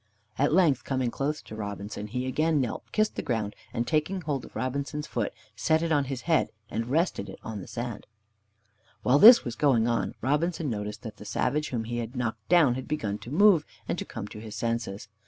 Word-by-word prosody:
At 145 - +3
length, 165 -5 +4
coming 130 -3 -1
close 150 +4 -2
to 110 - -9
Robinson, 105 0 -5
he 125 +4 -3
again 155 +4 +1
knelt, 125 -4 -2
kissed 215 0 +1
the - - 0
ground, 110 -4 -2 0.2
and 120 - -1
taking 160 +6 0
hold 145 -5 -2
of - - -15
Robinson's 140 +3 -2
foot, 115 -7 -2 0.2
set 160 +9 +2
it 165 - -1
on 145 -2 +3
his 130 -1 -4
head 160 +3 +2 0.2
as 110 - -2
it - - -4
rested 150 - 0
on 110 -3 -5
the - - -10
sand. 120 -3 -5 1.0
While 135 +3 +4
this 235 +5 +10
was 120 -2 -4
going 120 -6 +3
on, 115 -1 0
Robinson 150 +3 0
noticed 105 0 -5
that 110 -3 -7
the - - -10
savage 145 +8 0
whom 120 -3 -2
he 120 +2 -4
had 120 +2 -5
knocked 110 -3 -3
down 165 -7 +6
had 130 +1 -5
begun 105 -9 -2
to - - -10
move, 180 +1 +5 0.2
and - - -1
to - - -2
come 100 - -7
to 105 - -9
his 110 -1 -8
senses. 115 -4 -2
130 Hz, 210 wpm, -28 LUFS, 110-150 Hz, 1.0 s, this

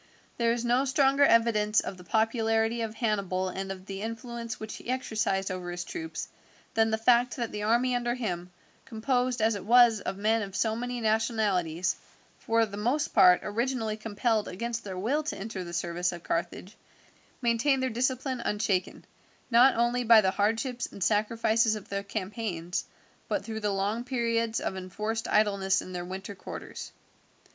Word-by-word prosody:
There 235 -1 +2
is 240 0 -1
no 245 +3 +3
stronger 275 +1 +3
evidence 225 -4 +4
of 190 - -4
the 180 - -13
popularity 225 +2 +1
of 225 -1 -4
Hannibal 200 -5 -1
and 195 +1 -4
of 190 -1 -8
the 195 0 -6
influence 230 0 -5
which 220 0 -6
he - - -10
exercised 220 -6 -1
over 180 -1 -5
his 175 0 -4
troops 325 - -5 0.5
than 225 0 +3
the 220 - +1
fact 240 +2 +3
that 235 -3 -3
the 210 - -4
army 240 +4 +2
under 240 0 0
him, 180 -8 -3 0.3
composed, 245 0 -1
as 225 +1 +3
it 200 - -5
was, 235 0 +6
of 190 - -4
men 220 +2 +2
of 195 -2 -6
so 220 +1 +1
many 245 +1 -3
nationalities, 210 -6 +1 0.4
for 230 0 +2
the 200 -2 -8
most 250 +8 0
part 180 -1 +7
originally 225 0 -1
compelled 220 0 -1
against 235 +4 -4
their 190 -2 -6
will 250 +11 0
to 305 - -4
enter 195 -1 -5
the 170 - -8
service 175 +1 -1
of 175 -1 -8
Carthage, 180 +4 -3 0.6
maintained 255 +3 +2
their 260 - 0
discipline 255 +2 -1
unshaken, 205 -4 -1 0.5
not 245 +3 +6
only 240 +1 +1
by 230 -1 +8
the 190 -2 +2
hardships 225 +5 0
and 200 - -4
sacrifices 220 +2 +2
of 210 - -9
the 200 0 -2
campaigns, 195 -4 -4 0.4
but - - -2
through 220 -1 -4
the 210 -1 -1
long 200 +4 -1
periods 230 -2 0
of - - -3
enforced 210 +5 -4
idleness 200 -3 +2
in 185 - -7
their 175 -1 -4
winter 190 +3 -6
quarters. 190 - -8
220 Hz, 170 wpm, -28 LUFS, 195-235 Hz, 0.6 s, by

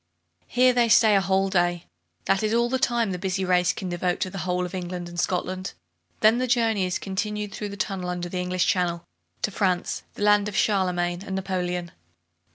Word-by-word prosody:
Here 250 +1 +4
they 240 -1 +3
stay 220 -1 +6
a 195 - +4
whole 190 +1 +1
day. 175 -2 +1 0.4
That 195 0 +2
is 215 +1 +1
all 235 0 +2
the 260 - +1
time 235 -5 +1
the 180 - -4
busy 190 0 -1
race 180 -1 +3
can 185 - -6
devote 175 0 -1
to 185 - -1
the 195 - -6
whole 180 0 -1
of 180 - -8
England 180 -1 -4
and 175 0 -6
Scotland. 185 +1 -2 0.5
Then 220 +3 +5
the 255 - 0
journey 225 -5 +2
is 180 - -1
continued 210 +1 -3
through 210 - -5
the 200 - -8
tunnel 190 -3 -3
under 175 0 -3
the 180 +1 -4
English 180 0 0
Channel, 175 -2 0 0.4
to 210 - 0
France, 185 -3 0
the - - -4
land 210 0 +4
of 210 - -4
Charlemagne 180 -3 +1
and 190 -2 -5
Napoleon. 180 -2 -2
190 Hz, 205 wpm, -25 LUFS, 180-210 Hz, 0.5 s, stay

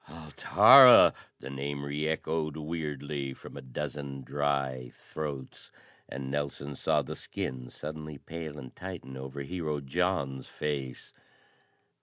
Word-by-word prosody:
"Altara!" 105 - +8 0.3
The 70 - -7
name 70 +1 -4
reechoed 80 +1 -2
weirdly 75 -3 -4
from - - -12
a - - -7
dozen 70 +1 -5
dry 70 -2 -1
throats, 70 -4 -7 0.4
and 65 +1 -5
Nelson 70 0 -3
saw - - +1
the - - -6
skin 65 -1 -5
suddenly 75 -1 -7
pale 80 0 -7
and 65 -3 -10
tighten 90 -8 -7
over 65 +1 -6
Hero 75 -1 -3
John's 70 -2 -1
face. 70 -4 -4
70 Hz, 115 wpm, -30 LUFS, 70-80 Hz, 0.4 s, Altara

